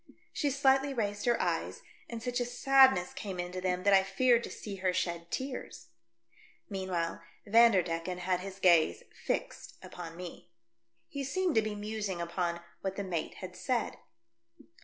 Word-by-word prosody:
She 295 -5 0
slightly 270 0 +3
raised 205 -1 -2
her 240 - +3
eyes, - - -2 0.3
and 230 -1 -6
such 245 0 -1
a 245 - 0
sadness 260 -6 +4
came 195 -4 -6
into 180 +1 -4
them 180 0 -1
that 200 - +4
I 195 - +7
feared 235 +5 +3
to - - -7
see 200 -2 -7
her 185 -1 +1
shed 170 -1 -2
tears. 260 +4 -5 0.8
Meanwhile, 185 -5 -2 0.2
Vanderdecken 185 -6 +3
had 180 0 0
his 190 +1 -7
gaze 170 - +4
fixed - - -4
upon 165 -2 -8
me. 180 -1 -9 0.6
He 280 -4 -5
seemed 360 +5 0
to 220 - +4
be 215 -1 -3
musing 205 -3 -3
upon 170 0 -2 0.2
what 190 -1 -3
the 200 - -3
mate 175 -4 -3
had - - -8
said. - - -1
195 Hz, 160 wpm, -31 LUFS, 180-240 Hz, 0.8 s, I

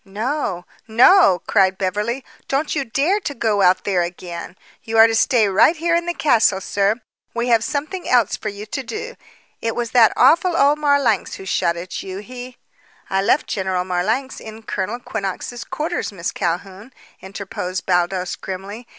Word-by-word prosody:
"No? 210 - -3 0.2
no!" 235 - +5
cried 190 -2 +3
Beverly. 210 +7 -2 0.2
"Don't 290 +4 -1
you 280 - 0
dare 285 - +1
to 285 -8 -5
go 215 -3 +1
out 185 0 +4
there 190 -3 +1
again. 175 0 -6 0.2
You 225 0 -3
are 225 - +9
to 225 - +1
stay 225 -1 +3
right 200 - +4
here 335 +1 0
in 340 0 -1
the 345 - -2
castle, 220 -9 +3
sir. 200 +2 +1 0.4
We 235 +1 -1
have 230 -2 +4
something 305 +8 -4
else 240 -5 +3
for 215 - -5
you 205 +1 -8
to 265 +5 -4
do. 430 - -6 0.5
It 225 0 -2
was 240 -1 -3
that 235 -3 +6
awful 340 +1 +4
old 290 +2 +4
Marlanx 285 -8 +1
who 190 - -10
shot 170 -2 0
at 180 +2 -6
you. 190 0 -7
He 250 +4 -9 0.3
" - - -30
"I 195 0 +2
left 230 +8 +2
General 190 -2 -1
Marlanx 215 +9 -1
in 220 0 -10
Colonel 205 +2 -3
Quinnox's 220 +1 -5
quarters, 325 -2 -3
Miss 180 -3 -4
Calhoun," 190 +7 -4 0.3
interposed 190 -1 -5
Baldos 180 0 0
grimly. 200 +5 -7
220 Hz, 175 wpm, -20 LUFS, 190-265 Hz, 0.5 s, are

